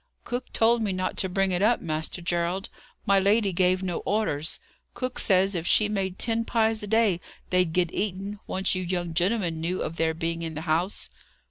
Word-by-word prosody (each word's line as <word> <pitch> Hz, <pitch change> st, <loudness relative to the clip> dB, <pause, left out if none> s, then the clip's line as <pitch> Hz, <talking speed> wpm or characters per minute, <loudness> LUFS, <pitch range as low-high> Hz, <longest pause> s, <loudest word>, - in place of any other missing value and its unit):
"Cook 245 Hz, +1 st, -4 dB
told 230 Hz, +1 st, +3 dB
me 205 Hz, -3 st, 0 dB
not 185 Hz, 0 st, -2 dB
to 190 Hz, -, +1 dB
bring 195 Hz, +1 st, +1 dB
it 180 Hz, 0 st, 0 dB
up, 230 Hz, +4 st, +4 dB
Master 160 Hz, +2 st, -3 dB
Gerald. 175 Hz, +2 st, -1 dB, 0.4 s
My 200 Hz, 0 st, +4 dB
lady 200 Hz, 0 st, +2 dB
gave 185 Hz, +1 st, +2 dB
no 180 Hz, -3 st, -2 dB
orders. 170 Hz, -8 st, -1 dB, 0.4 s
Cook 255 Hz, -1 st, -3 dB
says 195 Hz, 0 st, +3 dB
if 170 Hz, -1 st, -3 dB
she 215 Hz, -, +4 dB
made 195 Hz, -3 st, -2 dB
ten 230 Hz, 0 st, +2 dB
pies 225 Hz, -1 st, +1 dB
a 210 Hz, -, -4 dB
day 215 Hz, -5 st, +2 dB, 0.3 s
they'd 180 Hz, -2 st, +3 dB
get 175 Hz, 0 st, +1 dB
eaten, 200 Hz, +1 st, -3 dB
once 190 Hz, +1 st, 0 dB
you 185 Hz, -, -1 dB
young 175 Hz, -2 st, -2 dB
gentlemen 175 Hz, -2 st, 0 dB
knew 180 Hz, +3 st, -1 dB
of 165 Hz, -, -5 dB
their 160 Hz, 0 st, +1 dB
being 165 Hz, +1 st, -2 dB
in 165 Hz, -1 st, -4 dB
the 155 Hz, -, -4 dB
house." 170 Hz, +4 st, -1 dB
185 Hz, 200 wpm, -26 LUFS, 170-210 Hz, 0.4 s, up